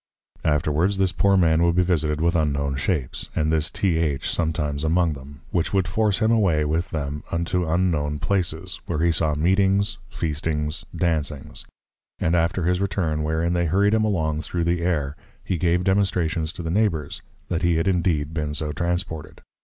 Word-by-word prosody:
Afterwards, 80 +5 +1
this 95 -1 +2
poor 100 -2 +3
Man 80 -2 +3
would 85 0 +3
be 90 - +4
visited 80 -4 0
with 85 +1 +2
unknown 70 -3 0
shapes, 70 -2 -2
and 80 0 +1
this 80 0 +1
T. 90 -5 0
H. 75 -5 -1
sometimes 75 -3 -1
among 85 0 +2
them; 70 0 -11
which 85 +1 0
would 95 -3 +2
force 105 +2 +1
him 110 0 +2
away 90 -10 +3
with 80 +5 -1
them, 75 -2 -3
unto 85 0 -1
unknown 80 -4 +1
Places, 90 +2 -2
where 85 - -2
he 85 - +4
saw 80 -2 +1
Meetings, 95 +5 +2
Feastings, 75 0 -3
Dancings; 75 -3 -2 0.5
and 80 - 0
after 85 +2 +1
his 90 +2 +1
return, 85 -6 -1
wherein 80 +3 0
they 85 -1 +1
hurried 100 +6 +3
him 110 -1 +3
along 80 -7 0
through 85 +1 -2
the 85 +1 0
Air, 75 -5 -1 0.3
he 95 - -1
gave 90 +1 +2
Demonstrations 90 -5 +1
to 85 - -7
the 80 - -2
Neighbours, 90 -7 0 0.3
that 85 - -1
he 85 -1 +2
had 80 +4 0
indeed 85 -5 +1
been 75 -2 -2
so 75 -1 -2
transported. 80 -1 -3
85 Hz, 175 wpm, -23 LUFS, 75-90 Hz, 0.5 s, be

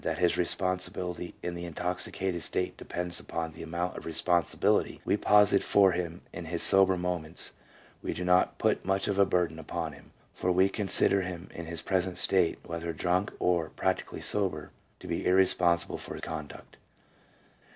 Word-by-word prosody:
that - - -1
his 90 -1 +2
responsibility 90 -1 -1
in 90 - -3
the 85 0 -6
intoxicated 90 +1 -3
state 90 - -2
depends 90 0 -2
upon 80 -1 -4
the 80 - -11
amount 85 +2 -3
of - - -7
responsibility 85 0 +1
we - - +2
posit 105 -1 +4
for 100 -2 +4
him 85 -1 -3
in 90 - -6
his 85 +1 -2
sober 95 -1 +5
moments, 90 -3 -3 0.5
we - - -3
do 90 - -4
not 90 0 +3
put - - +1
much 95 +1 0
of 100 -1 0
a 100 - +7
burden 85 -3 0
upon 80 0 -4
him, 75 - -16 0.2
for 90 - -1
we 95 +2 +4
consider 100 -1 +3
him 90 0 -6
in 85 -1 -7
his 85 -1 -5
present 95 -1 0
state, 90 -3 +2
whether 85 0 -4
drunk 90 +4 0
or 85 -3 +1
(practically) - - -2
sober, 90 -7 -1 0.3
to - - -13
be - - -2
irrespon 90 -2 +4
sible 85 - -4
for - - -7
conduct. 75 -2 -8
90 Hz, 170 wpm, -29 LUFS, 85-95 Hz, 0.5 s, a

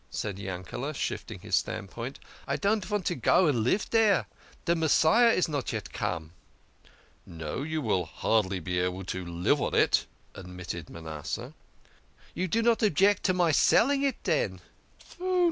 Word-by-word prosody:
said 100 -3 -4
Yankele, 95 +9 -5
shifting - - -4
his - - 0
standpoint. 115 +7 -3 0.2
" - - -22
I - - 0
don't 205 +1 +1
vant 210 -3 -2
to - - +1
go 185 - +3
and 145 -7 +2
live 125 - +1
dere. 220 -4 +4 0.4
De 170 - +3
Messiah 165 +8 +4
is 185 -6 +2
not 145 -5 -2
yet 110 -4 -5
come." 80 -2 -3 0.9
"No, 80 - -6
you 155 +1 -2
will 95 -6 +1
hardly 95 +3 0
be 90 +2 -2
able 90 +1 -2
to 95 0 -4
live 85 0 0
on - - -1
it," - - +3 0.3
admitted 90 -3 -7
Manasseh. 80 -2 -6 0.4
" - - -29
You 185 - -2
do 225 +6 +1
not 230 -1 +3
object 200 0 +3
to 185 - +3
my 175 -3 +3
selling 275 - +4
it, 275 -1 +1
den? - - 0
135 Hz, 160 wpm, -28 LUFS, -, 0.9 s, dere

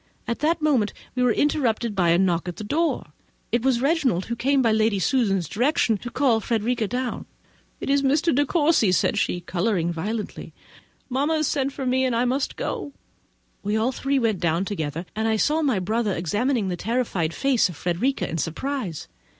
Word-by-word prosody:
At 235 - -2
that 315 +2 +1
moment 255 -9 +2 0.2
we 250 - -1
were 250 -1 +4
interrupted 235 -4 +1
by 175 -3 +2
a 170 - +5
knock 175 -2 +1
at 175 - -4
the 215 - -7
door: 270 - -1 0.4
it 235 - +2
was 255 -1 +2
Reginald, 275 - +1
who 235 - -3
came, 275 +4 +2
by 230 - +3
Lady 220 -1 +2
Susan's 195 - +1
direction, 245 - +1
to 240 - -6
call 250 -3 +2
Frederica 230 +1 -1
down. 250 +2 -3 0.5
"It - - -5
is 280 0 +3
Mr. 290 +5 +2
De 285 +3 +3
Courcy!" 295 - +3
said - - +2
she, 175 - -1
colouring 175 -1 -1
violently. 210 +6 -5 0.5
"Mamma 280 +5 0
has 310 -2 +1
sent 275 -1 0
for 270 -1 -5
me; 260 +1 +2
I 240 0 +1
must 265 +3 -1
go." 285 - -4 0.7
We 205 +2 -1
all 230 +4 +1
three 275 +2 -1
went 225 -7 +1
down 170 +2 +1
together; 160 -4 -3
and 220 +1 0
I 220 - +2
saw 300 +8 +2
my 270 -8 +1
brother 210 +3 0
examining 205 - 0
the 180 - -1
terrified 220 -8 -1
face 265 0 +2
of 175 - -8
Frederica 180 - -1
with 165 - -3
surprize. 185 - -3
235 Hz, 190 wpm, -24 LUFS, 190-270 Hz, 0.7 s, a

